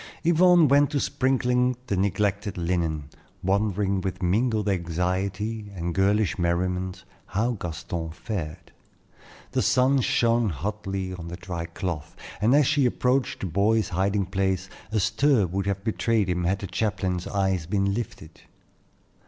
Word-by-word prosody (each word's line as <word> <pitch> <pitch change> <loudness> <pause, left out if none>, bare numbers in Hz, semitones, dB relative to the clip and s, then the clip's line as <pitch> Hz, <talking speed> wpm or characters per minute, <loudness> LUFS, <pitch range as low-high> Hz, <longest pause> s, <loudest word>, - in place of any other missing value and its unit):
Yvonne 170 0 +5
went 140 +1 +4
to 145 -1 0
sprinkling 125 -1 +1
the 100 - -1
neglected 100 +1 0
linen, 85 -3 -1 0.4
wondering 100 0 +1
with 95 0 -4
mingled 110 +3 +1
anxiety 95 +4 -2
and 85 -1 -3
girlish 100 -1 +2
merriment 90 +2 -1 0.2
how 115 +5 0
Gaston 85 -4 -4
fared. 85 -2 -6 0.8
The - - +1
sun 130 +1 +3
shone 115 -1 +2
hotly 95 +2 -3
on 85 -2 -7
the 85 +1 -6
dry 85 -2 -5
cloth, 85 -3 -5 0.3
and 115 +6 +4
as 145 -1 +5
she 145 -2 +3
approached 125 +2 0
the - - -2
boy's 105 +4 +2
hiding 100 +2 0
place, 95 0 -1 0.2
a 110 - +1
stir 110 +2 +3
would 95 +3 -2
have 100 -1 -2
betrayed 110 -2 +1
him 90 -1 0
had 95 +3 +1
the 100 - -6
chaplain's 95 -2 -1
eyes 95 -4 0
been 100 +1 +1
lifted. 100 -8 -6
100 Hz, 140 wpm, -25 LUFS, 90-115 Hz, 0.8 s, Yvonne